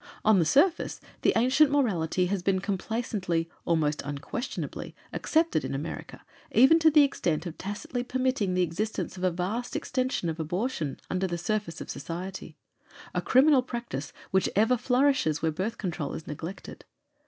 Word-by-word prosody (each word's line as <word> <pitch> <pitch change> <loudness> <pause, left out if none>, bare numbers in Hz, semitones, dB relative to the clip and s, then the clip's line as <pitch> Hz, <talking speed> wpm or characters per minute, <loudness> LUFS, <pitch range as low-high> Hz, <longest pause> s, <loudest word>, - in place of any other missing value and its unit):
On 215 -3 +6
the 165 - +3
surface, 320 - +2 0.2
the - - +4
ancient 260 +6 +5
morality 185 - +1
had 185 0 -2
been 195 0 +2
complacently, 195 -4 -2 0.2
almost 155 -3 +1
unquestionably, 145 - -5 0.2
accepted 320 - +1
in - - -3
America, 150 +4 -6 0.3
even 270 +8 +6
to 320 0 +6
the 300 -1 +7
extent 170 - 0
of 170 -2 -5
tacitly 205 +5 -4
permitting 255 -6 0
the 180 - +3
existence 195 +7 -3
of 185 - -7
a 185 - +4
vast 190 +8 -3
extension 255 - -1
of 165 0 -3
abortion, 165 - -2
under 185 +1 0
the 175 -1 -3
surface 190 0 -2
of - - -7
society 180 +3 -6 0.6
a - - 0
criminal 270 +1 +5
practice 235 - -5 0.2
which 190 0 +2
ever 225 +5 +4
flourishes 250 - +2
where 160 - +2
Birth 190 +8 -3
Control 175 -7 -3
is 160 - -7
neglected. 165 +6 -7
195 Hz, 155 wpm, -28 LUFS, 170-250 Hz, 0.6 s, the